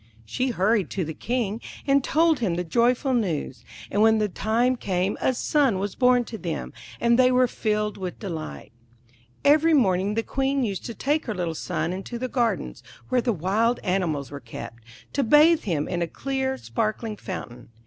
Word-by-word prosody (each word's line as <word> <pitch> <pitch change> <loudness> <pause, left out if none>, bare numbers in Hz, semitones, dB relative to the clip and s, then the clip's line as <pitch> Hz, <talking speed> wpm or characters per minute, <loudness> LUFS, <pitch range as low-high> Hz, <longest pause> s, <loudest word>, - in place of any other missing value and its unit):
She 250 - -1
hurried 210 -4 +1
to 185 -4 -2
the 160 - -5
King, 230 +1 -2 0.2
and 275 -1 +3
told 320 +1 +3
him 195 -8 0
the 175 - -1
joyful 245 - +2
news; 160 - -2 0.3
and 205 - +1
when 220 0 +5
the 215 -1 +1
time 230 +6 +1
came 190 -4 -1
a - - +3
son 270 -5 +2
was 195 0 -3
born 250 -1 +4
to 225 -2 -7
them, 165 -3 -4 0.3
and 235 +1 +3
they 255 0 +6
were 255 0 +4
filled 210 -3 -2
with 185 -2 -5
delight. 160 - -6 0.7
Every 310 +3 +5
morning 195 -5 +2
the 225 - 0
Queen 270 +1 0
used 200 -5 -3
to 235 - -6
take 295 +5 0
her 215 - -2
little 175 -3 -2
son 165 +2 -2
into 195 +6 -5
the 255 +2 -3
gardens, 240 -3 -1 0.3
where 255 -1 +2
the 240 - +1
wild 210 +6 +1
animals 170 -8 -1
were 140 - -6
kept, 115 -1 -9 0.3
to 280 - +1
bathe 305 +7 +5
him 155 -6 -1
in 175 -1 -2
a 170 - 0
clear, 265 - -2
sparkling 220 -2 -2
fountain. 125 - -8
220 Hz, 185 wpm, -25 LUFS, 180-255 Hz, 0.7 s, they